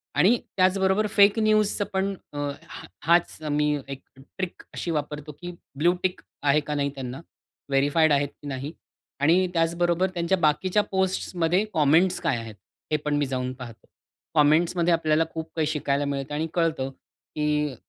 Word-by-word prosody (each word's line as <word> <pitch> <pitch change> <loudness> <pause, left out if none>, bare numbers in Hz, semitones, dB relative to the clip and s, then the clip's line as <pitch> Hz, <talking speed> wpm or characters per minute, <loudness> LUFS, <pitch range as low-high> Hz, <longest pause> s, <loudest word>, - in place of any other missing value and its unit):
आणि 220 +7 +5 0.2
त्याचबरोबर 190 +2 +3
फेक 200 +2 +6
न्यूजच 215 -1 +2
पण 195 +1 0 0.2
अ, - - -7 0.3
हा 170 - -11 0.2
हाच 170 +2 +3
मी 150 0 +1
एक 135 -1 -7 0.2
ट्रिक 175 +7 -7
अशी 170 - -3
वापरतो 150 -1 -4
की 175 0 -5 0.3
ब्लू 170 +4 +3
टिक 185 -1 -1 0.2
आहे 145 +1 +4
का 150 - -2
नाही 140 -1 0
त्यांना? 130 -1 -6 0.5
व्हेरीफाईड 145 +3 +3
आहेत 145 0 +2
की 145 - -8
नाही? 135 +2 -4 0.5
आणि 170 +6 +4
त्याचबरोबर 170 +2 +1
त्यांच्या 175 +2 +1
बाकीच्या 180 +6 +2
पोस्ट्स 190 -1 -1
मध्ये 175 +3 +2
कॉमेंट्स 165 +5 +3
काय 155 -8 +1
आहेत? 115 -2 -8 0.4
हे 155 - +3
पण 150 -1 +1
मी 145 - +1
जाऊन 130 -1 -3
पाहतो. 120 -4 -11 0.5
कॉमेंट्समध्ये 165 +3 +3
आपल्याला 160 -1 +2
खूप 160 0 -5
काही 160 -2 +1
शिकायला 145 -2 0
मिळत 140 0 -3
आणि 155 +2 -1
कळतं 160 -6 0 0.5
की 150 -2 0
160 Hz, 160 wpm, -25 LUFS, 145-180 Hz, 0.5 s, फेक